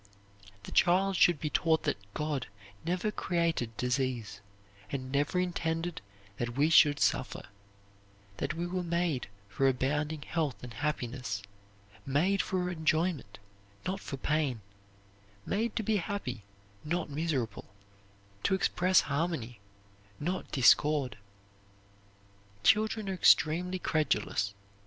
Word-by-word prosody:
The - - -9
child 190 +2 +3
should 175 -3 +5
be 150 0 -3
taught 160 -1 +2
that - - -1 0.2
God 150 -4 -2 0.4
never 180 +5 -1
created 165 - -1
disease, 125 -5 -1 0.5
and 130 -2 -4
never 145 +6 +1
intended 170 -1 -2 0.4
that 120 +1 -3
we 150 +3 +3
should 145 -2 +6
suffer; 125 - 0 0.9
that - - -2
we 170 +1 -2
were 180 +1 -2
made 170 -5 -1 0.2
for 135 +7 +1
abounding 145 +4 0
health 155 -7 -2
and 125 -2 -7
happiness, 125 -6 -3 0.6
made 175 +9 +2
for 180 -1 -1
enjoyment 160 - 0 0.5
not 190 +2 -2
for 140 - -6
pain 145 -5 0 0.8
made 220 +3 -1
to 225 - 0
be 215 0 +2
happy, 175 - -4 0.4
not 170 0 -2
miserable, 140 -8 -2 0.8
to 190 - +2
express 185 -2 +3
harmony, 140 -6 -2 0.6
not 180 +5 -3
discord. 140 0 +4 1.5
Children 215 0 +3
are 190 - -1
extremely 180 +1 +4
credulous. 105 - 0
155 Hz, 115 wpm, -31 LUFS, 130-180 Hz, 1.5 s, should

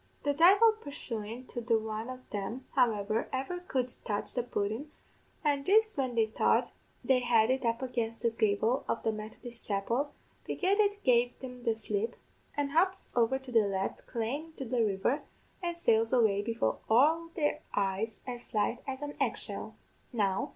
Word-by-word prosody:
"The 285 - +2
divle 390 +9 +7
purshuin 235 -4 -4
to 240 - -4
the 230 -1 +3
one 220 +1 -4
of 255 0 -8
them, 220 +6 -4
however, 220 -4 +2
ever 270 +7 -2
could 255 -8 -2
touch 205 -2 -2
the 245 - +1
pudden, 225 +4 -2 0.5
an' 285 -2 +2
jist 435 +5 +4
when 260 -3 -1
they 225 -1 +4
thought 220 - +2 0.3
they 260 -1 +4
had 240 -1 +4
it 260 0 0
up 230 +2 0
against 235 -3 -2
the 235 - +3
gavel 220 +3 +1
of - - -1
the 225 - +2
Methodist 220 +2 -7
chapel, 235 +8 0 0.3
begad 390 +2 0
it 410 -1 +2
gave 245 -1 +3
them 250 -2 -9
the 230 -1 +2
slip, 220 +1 -2 0.4
and 285 -1 0
hops 370 +5 +1
over 240 +2 +3
to 265 -1 -11
the 225 -3 +4
left, 195 -1 -3
clane 240 +7 -2
into 315 -4 -8
the 240 -1 +1
river, 205 +6 +1 0.4
and 345 -1 -2
sails 225 -6 +3
away 220 -5 +4
before 230 +2 -1
all 315 +9 +4
their 300 -3 +1 0.2
eyes 200 +2 -1
as 245 -2 -7
light 215 +3 +1
as 270 +1 -4
an 290 0 -5
egg - - +1
shell. - - -6
245 Hz, 170 wpm, -31 LUFS, 220-280 Hz, 0.5 s, divle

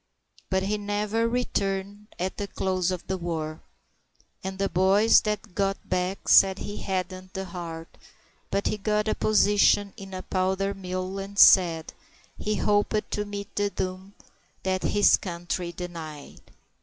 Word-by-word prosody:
But 190 0 +1
he 210 +2 -1
never 210 +2 0
returned 205 -4 -2
at 185 +2 -3
the 205 - -3
close 185 -2 -1
of 185 -2 -4
the 190 -1 -3
war, 160 -2 -4 0.8
And 190 0 -4
the 195 0 +1
boys 195 +4 +5
that 210 -2 -3
got 195 +1 -1
back 185 +1 -2
said 195 -1 +6
he 205 - -6
hadn't 185 0 -4
the 190 0 -3
heart; 170 -2 -8 0.5
But 200 - -1
he 210 - -1
got 210 +1 0
a 215 - +2
position 205 -1 +3
in 195 -1 -8
a 185 - -6
powder 190 +1 0
mill, 185 0 -4
and 200 +1 -7
said 170 -5 +6 0.4
He 215 0 -2
hoped 205 +1 +1
to 210 - -1
meet 205 0 -7
the 205 0 +1
doom 190 +1 -5 0.5
that 185 0 0
his 205 0 +4
country 175 -1 -4
denied. 165 -4 -8
190 Hz, 150 wpm, -26 LUFS, 185-205 Hz, 0.8 s, said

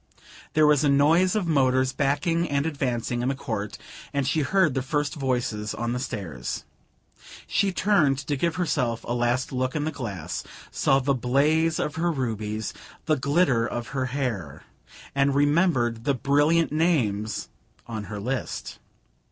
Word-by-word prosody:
There 155 0 +5
was 150 -1 +4
a 145 - +3
noise 160 +7 +4
of 210 -4 +1
motors 130 -4 +2
backing 165 +5 +1
and 140 0 0
advancing 125 -5 -1
in 125 - -1
the 135 - -1
court, 105 -5 -4 0.3
and 140 -2 -1
she 160 - +1
heard 175 0 +2
the 135 - 0
first 145 +2 -1
voices 120 -6 -2
on 120 0 -2
the 125 - -2
stairs. 95 - -4 0.8
She 200 -1 +1
turned 180 -9 +3
to 140 +2 -2
give 170 +4 0
herself 130 -10 -1
a - - -5
last 120 +1 0
look 130 -1 -1
in 150 - 0
the 155 - -1
glass, 105 - -5 0.3
saw 135 - +3
the 135 +1 +1
blaze 150 +6 +2
of 150 +1 -2
her 170 +1 +1
rubies, 110 -6 -3 0.3
the 155 -1 +3
glitter 140 -3 +2
of 120 0 -4
her 130 -1 -1
hair, 110 - -3 0.5
and 140 0 +2
remembered 145 -6 +2
the 140 +1 +1
brilliant 145 +5 +2
names 115 - 0 0.4
on 110 -3 -5
her 105 -1 -6
list. 125 +5 -4
135 Hz, 160 wpm, -25 LUFS, 120-155 Hz, 0.8 s, There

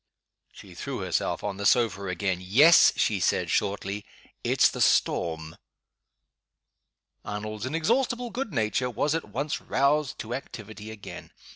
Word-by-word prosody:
She - - -14
threw - - -5
herself - - -1
on 100 -2 -3
the 100 - -4
sofa 105 -5 +2
again. 90 0 -1
"Yes," 135 - +6
she 105 -3 +1
said, - - +1
shortly. 100 +1 -1 0.4
"It's - - +4
the - - -4
storm." 80 -2 +1 1.7
Arnold's 105 +2 -5
inexhaustible 235 - 0
good 255 -2 -4
nature 125 0 0
was 145 +5 0
at 165 - -2
once 140 +3 -3
roused 140 +1 +1
to 115 +2 -6
activity 110 -5 -8
again. 110 -2 -9
110 Hz, 130 wpm, -26 LUFS, 100-150 Hz, 1.7 s, Yes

